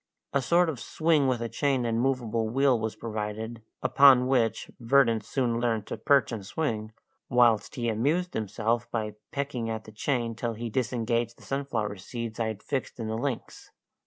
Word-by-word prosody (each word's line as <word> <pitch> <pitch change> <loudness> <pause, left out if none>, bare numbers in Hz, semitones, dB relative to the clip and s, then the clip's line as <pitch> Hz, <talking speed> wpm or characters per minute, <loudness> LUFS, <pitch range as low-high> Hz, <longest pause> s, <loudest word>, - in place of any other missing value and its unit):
A 140 - +2
sort 170 +7 +3
of 150 -7 -3
swing 155 -1 +2
with 125 -2 0
a - - -1
chain 135 0 0
and 115 0 0
movable 115 -4 0
wheel 130 0 +3
was 110 0 -3
provided, 110 +1 -5 0.2
upon 135 -3 +7
which 125 -4 +1
Verdant 115 -2 +3
soon 120 -2 0
learned 115 -3 0
to - - -5
perch 135 +2 +3
and 110 -4 -4
swing, 110 -2 -2 0.4
whilst 120 -4 +3
he 120 -2 -2
amused 150 +11 0
himself 115 +3 -1
by 110 -3 -2 0.2
pecking 140 -5 -3
at 110 -1 -3
the 110 - -12
chain 120 +1 -1
till 115 0 -3
he 115 +1 -5
disengaged 120 -1 -1
the - - -17
sunflower 115 -7 -2
seeds 115 +3 -6
I 115 - +1
had 110 -2 -5
fixed 135 -2 -3
in 110 -1 -3
the 110 - -1
links. 125 +1 -4
120 Hz, 180 wpm, -28 LUFS, 110-135 Hz, 0.4 s, upon